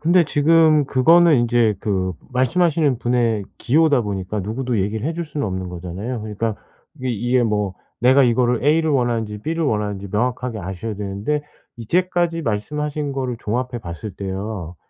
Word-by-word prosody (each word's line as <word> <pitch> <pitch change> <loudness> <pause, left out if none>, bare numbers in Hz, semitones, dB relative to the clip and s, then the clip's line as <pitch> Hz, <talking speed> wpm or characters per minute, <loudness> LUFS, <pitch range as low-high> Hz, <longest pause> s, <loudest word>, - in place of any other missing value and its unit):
근데 170 +2 +4
지금 155 0 +4
그거는 160 +4 +5
인제 120 -2 +2
그 95 -3 -1 0.2
말씀 130 +7 +2
하시는 150 -7 +2
분의 120 -4 +1
기호다 145 -1 +3
보니까 100 0 -3
누구도 115 +3 -2
얘기를 105 +6 -1
해 165 - -1
줄 170 +1 -4
수는 150 -4 -3
없는 95 -1 -4
거잖아요. 90 +7 -5
그러니까 110 0 -3 0.4
이게, 130 -2 -4
이게 120 +3 +1
뭐 105 -4 0 0.3
내가 130 +3 +5
이거를 120 0 +2
A를 160 +1 +3
원하는지 115 -5 0
B를 165 +8 -2
원하는지 105 -5 -2
명확하게 125 +1 -1
아셔야 95 +4 -5
되는데 105 +9 -2 0.3
이제까지 170 +6 0
말씀하신 145 +6 -2
거를 130 -3 -3
종합해 125 +3 -2
봤을 85 +4 -7
때요. 95 -2 -5
120 Hz, 370 characters per minute, -21 LUFS, 105-145 Hz, 0.4 s, 그거는